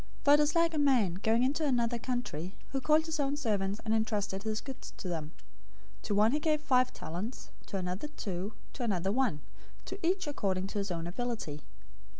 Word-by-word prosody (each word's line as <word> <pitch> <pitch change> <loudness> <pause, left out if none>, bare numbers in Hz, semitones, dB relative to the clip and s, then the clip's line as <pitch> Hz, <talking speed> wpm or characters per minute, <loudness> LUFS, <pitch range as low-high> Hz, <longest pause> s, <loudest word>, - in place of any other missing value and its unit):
025:014 - - -23
"For 285 - +8
it 295 - +7
is 300 +2 +3
like 335 0 +4
a 310 - +1
man, 255 -11 +4
going 225 +3 +3
into 285 +5 +1
another 240 -4 +2
country, 225 - -3 0.2
who 270 0 -1
called 310 +3 +4
his 320 -1 -3
own 285 0 +1
servants, 205 -6 0
and 220 - +1
entrusted 210 -3 0
his 215 0 -1
goods 270 -2 -8
to 190 - -5
them. 165 -4 -2 0.7
025:015 - - -23
To 205 - +1
one 215 +2 +5
he 295 - +1
gave 305 0 +2
five 255 -4 +3
talents, 190 +10 -6 0.2
to 195 - -3
another 185 +7 -2
two, 200 -7 -4 0.2
to - - -7
another 195 -5 +1
one; 230 - +1 0.4
to 380 - -6
each 370 +3 +2
according 195 -10 -1
to 200 +1 -3
his 200 0 -2
own 165 -2 -2
ability. 180 - -3
230 Hz, 205 wpm, -32 LUFS, 195-285 Hz, 0.7 s, For